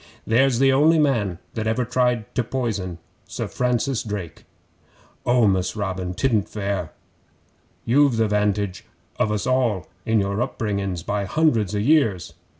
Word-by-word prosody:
'There's 125 +2 +3
the 135 +1 +4
only 155 +4 +5
man 115 - +1 0.2
that 110 -1 -3
ever 120 +3 0
tried 125 -2 0
to 125 - 0
poison 110 -8 -3 0.3
Sir - - -4
Francis 125 0 0
Drake!' 100 -7 -6 0.8
'Oh, 120 -1 +4
Mus' 95 -2 +1
Robin! 95 -3 -3
'Tidn't 110 -5 +1
fair. 100 -6 -3 0.9
You've 135 0 +3
the 110 -1 +2
'vantage 105 -2 0 0.4
of 105 - +2
us 105 +1 -1
all 125 -8 +1 0.2
in 110 -1 +2
your 100 +2 -1
upbringin's 100 -8 -2
by 100 0 -2
hundreds 115 - +1
o' - - 0
years. 110 - +2
110 Hz, 145 wpm, -23 LUFS, 100-125 Hz, 0.9 s, only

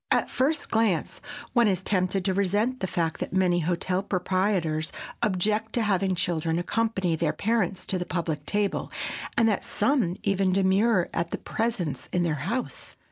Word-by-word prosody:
At - - +3
the - - -13
first 290 +3 0
glance 220 -6 +1 0.3
one 235 -2 +5
is 190 -2 0
tempted 185 -1 0
to 190 - +2
resent 205 +6 +1
the 190 - -1
fact 165 -2 -1
that - - -4
many 180 -2 +3
hotel 180 +2 0
proprietors 185 -4 0 0.3
object 215 +2 0
to 235 - +1
having 195 -2 +1
children 165 -1 0
accompany 190 -2 0
their 160 -1 0
parents 195 0 0
to 185 - 0
the 180 - -2
public 170 -3 -3
table, 205 -1 0 0.5
and 230 - +5
that 210 -3 +1
some 245 -11 +1
even 195 -2 +2
demur 195 +1 +3
at 170 0 -1
their - - -3
presence 220 - -2
in 180 - +1
the 165 -2 +1
house. 190 - -4
190 Hz, 170 wpm, -26 LUFS, 175-215 Hz, 0.5 s, one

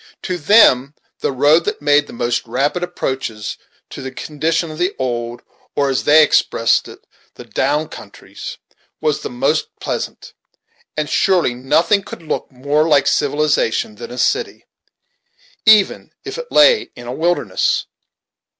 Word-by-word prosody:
To 180 -1 -3
them 145 - +5 0.2
the - - -1
road 145 +5 +4
that - - -2
made 145 0 +3
the - - -11
most 120 0 -2
rapid 140 +9 -1
approaches 130 - -4 0.3
to - - -8
the 130 - -5
condition 155 +4 -2
of 155 - -9
the 180 +3 0
old, 120 -2 -3 0.3
or, 140 -1 +1
as 130 - -1
they 155 +1 +7
expressed 115 -5 +2
it, - - -14 0.3
the - - -10
down 150 +1 0
countries, - - -10 0.4
was 150 -2 0
the - - -5
most 135 +6 0
pleasant; - - -5 0.6
and 155 -1 -1
surely 180 -8 +2
nothing 150 - +2
could 170 - -10
look 155 - -4
more 145 +4 0
like 145 -4 +4
civilization 145 -7 0
than 120 - -8
a 125 - -9
city, 465 - -1 1.0
even 215 -2 +4 0.2
if - - -6
it - - -8
lay 465 -4 +5
in 120 - -11
a 120 - -5
wilderness! 160 - 0
145 Hz, 150 wpm, -18 LUFS, 125-165 Hz, 1.0 s, they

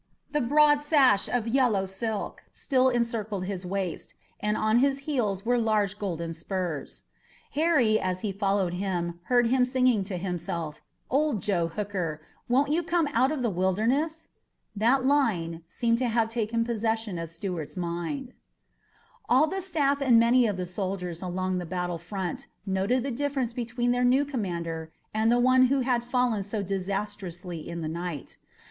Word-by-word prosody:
The 295 - +1
broad 295 +3 +5
sash 285 -8 +4
of 240 -2 0
yellow 230 -6 +2
silk 205 +3 -4
still 260 -2 +2
encircled 225 -5 -1
his 185 -2 -4
waist, 190 -2 -4 0.2
and 210 +1 0
on 215 +2 +3
his 275 +1 +2
heels 220 -9 -1
were 245 +1 +3
large 210 -3 +1
golden 170 -4 -3
spurs. 170 -2 -4 0.5
Harry, 280 -9 +3
as 185 0 -2
he 210 - -1
followed 195 -2 0
him, 175 -2 -2
heard 245 +1 +3
him 255 0 +4
singing 250 -4 +2
to 190 -2 -4
himself, 170 -3 -4 0.3
"Old 285 -3 +2
Joe 175 -3 +1
Hooker, 180 -4 -3 0.3
won't 275 +4 +3
you 325 +3 +2
come 335 -2 +1
out 260 +4 +3
of 290 -5 -2
the 235 - +1
Wilderness?" 230 - 0 0.5
That 245 +5 +3
line 195 - +1
seemed 230 -1 0
to 255 - +1
have 225 -1 +1
taken 230 0 -1
possession 220 -4 -1
of 165 -1 -5
Stuart's 165 0 -5
mind. 175 - -3 1.0
All 260 +5 +6
the 385 +4 -3
staff 285 -6 +1
and 245 -4 +6
many 235 +1 +5
of 205 -3 -2
the 180 - -2
soldiers 180 -2 -4
along 185 0 -2
the 175 - -5
battle 175 -1 -2
front 190 -3 -5 0.2
noted 195 +6 +1
the 275 - -2
difference 265 -2 -1
between 240 0 -1
their 245 0 +1
new 260 +3 +4
commander 170 - -4 0.2
and 220 +1 +2
the 240 - +4
one 255 +1 +5
who 275 +1 +2
had 245 -2 +1
fallen 245 -3 +1
so 205 +1 -3
disastrously 190 -3 -4
in 170 0 -5
the 160 - -3
night. 170 -2 -5
215 Hz, 165 wpm, -27 LUFS, 185-255 Hz, 1.0 s, All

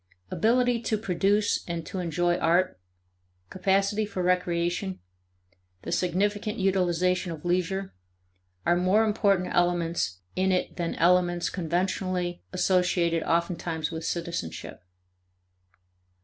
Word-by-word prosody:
Ability 245 +1 +2
to 220 -2 0
produce 205 +1 +1
and 170 -2 -4
to 190 - -5
enjoy 175 0 +1
art, 175 - +2 0.7
capacity 195 +3 +1
for 200 -3 -3
recreation, 180 +1 0 0.8
the - - -5
significant 205 +4 0
utilization 180 -1 +1
of 160 0 -8
leisure, 185 +2 -1 0.7
are 175 - +4
more 185 +5 +3
important 200 -4 +1
elements 170 - 0
in 190 +1 +2
it 180 - -1
than 170 -2 -2
elements 175 0 +2
conventionally 180 0 -1
associated 180 -2 +2
oftentimes 170 -1 -1
with 160 0 -5
citizenship. 170 - -4
180 Hz, 105 wpm, -27 LUFS, 170-195 Hz, 0.8 s, are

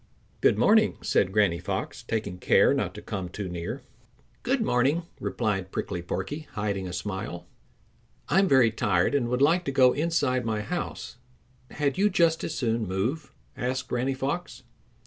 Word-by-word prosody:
"Good - - +4
morning," - - +4
said 95 - +1
Granny 100 -5 +2
Fox, - - -4
taking 100 -5 -3
care - - +4
not - - -2
to - - -9
come 95 -3 -4
too 100 +2 -5
near. 85 -1 -5 0.6
"Good 255 +1 0
morning," 140 - +2 0.2
replied 95 -1 -2
Prickly 90 -3 -3
Porky, 145 - -4
hiding 100 -3 -2
a - - -6
smile. 95 0 -5 0.8
"I'm 195 +2 +3
very 130 -7 +5
tired 100 -1 +1
and 135 -4 +1
would 125 +2 +1
like 170 +5 +4
to - - -1
go 130 -2 +5
inside 145 -5 0
my 110 -2 -1
house; 175 -1 -5 0.5
had 145 +2 -1
you 205 +1 +4
just 170 -4 +2
as 160 - -3
soon 115 -5 -1
move?" 120 - -2 0.2
asked 130 +1 -3
Granny 130 +2 0
Fox. 140 +7 -4
125 Hz, 160 wpm, -27 LUFS, 100-145 Hz, 0.8 s, very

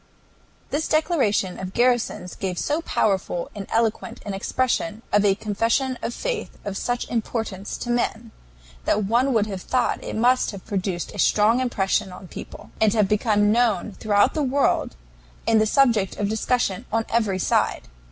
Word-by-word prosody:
This 300 +2 0
declaration 265 - +1
of 190 0 -6
Garrison's 240 -7 +1
gave 185 -2 -4
so 300 - 0
powerful 190 - -1
and 200 -2 -7
eloquent 225 -1 0
an 205 - -3
expression 220 +1 -1
of 205 0 +5
a 200 -2 +4
confession 230 +5 0
of - - -2
faith - - -4
of 200 -1 -3
such 245 +4 -2
importance 220 -4 -3
to 240 - -3
men, 235 -1 -1 0.5
that 210 - +2
one 240 +7 +2
would 220 -4 +2
have 195 -3 -5
thought 250 +3 0
it - - -5
must 245 +3 +3
have 200 -3 -8
produced 190 -3 -3
a 205 - -8
strong 215 +6 +4
impression 195 -6 0
on 180 +1 -10
people, - - -10
and 215 -2 +4
have 210 -3 +3
become 210 0 +2
known 220 -3 +2
throughout 205 +4 +2
the 310 - -1
world 275 - +1 0.5
and 220 -1 +4
the 215 - +2
subject 230 -6 +2
of 205 - 0
discussion 220 -2 0
on 225 +1 +1
every 215 -5 +1
side. 185 - +1
220 Hz, 165 wpm, -23 LUFS, 200-245 Hz, 0.5 s, of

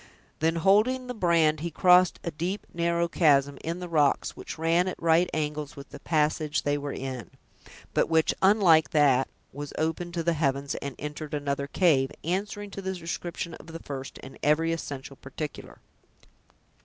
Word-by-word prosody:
Then, 165 +1 +1
holding 215 +9 +3
the 250 - -5
brand, 170 -7 +2
he 170 +3 -3
crossed 180 +2 +4
a 170 - -3
deep, 175 +6 -3
narrow 170 0 +1
chasm 145 -5 +3
in 165 +2 -3
the 180 - -5
rocks 150 -4 +1
which - - -8
ran 165 +3 +2
at 185 - -4
right 165 +1 +3
angles 150 -1 -3
with 140 0 -11
the - - -9
passage 155 -1 0
they 145 0 +1
were 145 -1 -4
in, 130 -7 -5 0.6
but - - +2
which, 160 -1 +3
unlike 185 -7 +5
that, 135 -4 +3 0.3
was 145 0 -7
open 160 +2 -2
to 170 -1 -2
the 170 +1 +2
heavens, 140 -2 -1
and 140 -2 -5
entered 150 0 -5
another 140 -1 -2
cave, 140 -5 +2
answering 205 +4 -3
to 195 - -6
the 190 0 -3
description 170 0 -5
of 160 - -12
the 165 0 -7
first, 135 -2 -7
in 135 0 -11
every 160 +3 +2
essential 140 -4 -6
particular. 145 +2 -7
160 Hz, 170 wpm, -27 LUFS, 145-175 Hz, 0.6 s, unlike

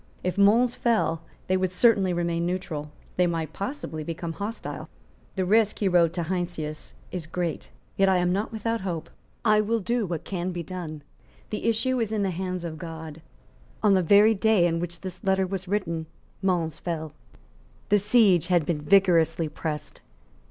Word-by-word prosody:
If 180 - -1
Mons 225 +5 +4
fell, 215 -9 +1 0.2
they 185 - +1
would 185 -1 0
certainly 195 -1 +4
remain 170 -1 0
neutral; 170 -4 -3 0.3
they 180 0 +4
might 165 -2 -2
possibly 200 - -5
become 165 +1 -4
hostile. 210 +6 -6 0.5
"The 190 -2 0
risk," 215 +2 +3
he 205 - +1
wrote 175 -3 +4
to 175 - -2
Heinsius, 170 -3 -4 0.2
"is 175 -4 -5
great; 170 -1 -3 0.3
yet 195 0 +4
I 190 - +4
am 180 0 +2
not 205 +3 -1
without 225 +1 -2
hope. 175 -4 -4 0.3
I 215 -1 +5
will 225 +2 0
do 230 +1 -1
what 170 -3 -3
can 185 -1 -3
be 175 -1 -4
done. 155 -3 -6 0.5
The - - -3
issue 240 +3 +1
is 225 -2 -1
in 215 -2 0
the 190 - 0
hands 180 0 -3
of 160 -2 -5
God." 160 -1 -8 0.6
On 210 -2 +5
the 190 - +4
very 205 +5 +6
day 210 -4 +3
on 165 -1 0
which 175 0 -5
this 185 0 -8
letter 190 -1 +2
was 190 0 -4
written 170 -5 -2 0.3
Mons 175 -5 0
fell. 160 -3 -4 0.8
The 205 - +5
siege 200 -5 +4
had 175 -4 +3
been 155 -2 -1
vigorously 165 -2 +3
pressed. 150 -1 -5
180 Hz, 175 wpm, -26 LUFS, 165-200 Hz, 0.8 s, very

